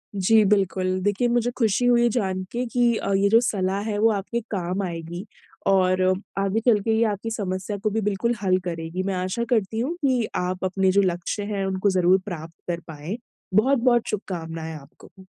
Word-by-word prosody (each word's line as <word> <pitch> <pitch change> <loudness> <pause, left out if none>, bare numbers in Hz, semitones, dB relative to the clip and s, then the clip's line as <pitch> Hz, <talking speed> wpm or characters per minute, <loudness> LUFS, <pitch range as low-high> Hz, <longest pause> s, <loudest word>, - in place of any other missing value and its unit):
जी, 210 +3 +4
बिल्कुल। 190 -2 +1
देखिए 205 +4 +1
मुझे 240 0 +1
खुशी 230 0 +2
हुई 240 -1 +4
जान 190 -5 -1
के 245 +1 -2
कि 240 -1 +2
अ, 200 - -2
ये 195 +1 +3
जो 225 +2 +6
सलाह 195 -4 0
है 205 - -1
वो 225 +1 +5
आपके 210 +3 -2
काम 185 -1 -2
आएगी 170 +1 -5 0.4
और 185 -1 +3 0.4
आगे 195 +3 +1
चल 230 -4 +5
के 225 - 0
ये 230 - +3
आपकी 210 +1 -2
समस्या 195 -1 -3
को 215 - +2
भी 220 +2 -1
बिल्कुल 210 +4 0
हल 185 -2 +3
करेगी। 165 +1 -3
मैं 195 0 -1
आशा 185 +6 -2
करती 220 -2 +1
हूँ 280 +9 -1
कि 255 -5 +2
आप 180 +1 -2
अपने 190 0 +2
जो 200 +2 +4
लक्ष्य 185 +2 -1
हैं 195 -1 -1
उनको 190 +1 +1
ज़रूर 185 0 +4
प्राप्त 165 -4 -7
कर 170 -1 -2
पाएँ। 160 +7 -6 0.4
बहुत-बहुत 240 0 +3
शुभकामनाएँ 165 -5 -4
आपको। 190 +6 -17
195 Hz, 185 wpm, -24 LUFS, 185-225 Hz, 0.4 s, जो